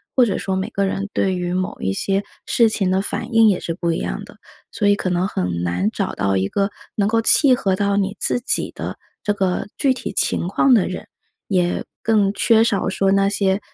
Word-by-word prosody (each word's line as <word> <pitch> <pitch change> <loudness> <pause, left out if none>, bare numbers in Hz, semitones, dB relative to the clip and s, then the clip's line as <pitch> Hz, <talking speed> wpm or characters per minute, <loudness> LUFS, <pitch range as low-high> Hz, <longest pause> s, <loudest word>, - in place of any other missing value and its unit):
或 255 - +5
者 205 -6 0
说 190 -1 -3
每 190 - -3
个 200 - -1
人 195 +1 -3
对 190 -1 0
于 180 0 -3
某 185 0 -3
一 95 - -1
些 195 - -1 0.2
事 230 -2 +3
情 195 -4 0
的 190 +1 +1
反 225 +4 -4
应 225 -1 +6
也 190 - +1
是 165 - -4
不 170 0 -2
一 165 - -1
样 - - -4
的。 - - -16 0.3
所 205 - -1
以 205 - +4
可 185 - -3
能 180 +1 0
很 90 - -3
难 90 +3 0
找 - - -3
到 95 -1 0
一 95 - 0
个 200 - -1 0.3
能 200 -1 +1
够 225 +2 +1
契 260 +2 +7
合 195 -5 0
到 200 +1 0
你 200 0 -1
自 - - +2
己 245 - +1
的 - - -6 0.3
这 205 - 0
个 190 -3 -1
具 275 - +2
体 250 - -6
情 - - +1
况 260 +8 +2
的 205 - +2
人， 185 - -7 0.4
也 180 -3 0 0.2
更 210 -3 +2
缺 225 0 +3
少 205 -4 0
说 195 0 0
那 195 0 +3
些， 195 -1 +1
195 Hz, 245 characters per minute, -20 LUFS, 180-210 Hz, 0.4 s, 契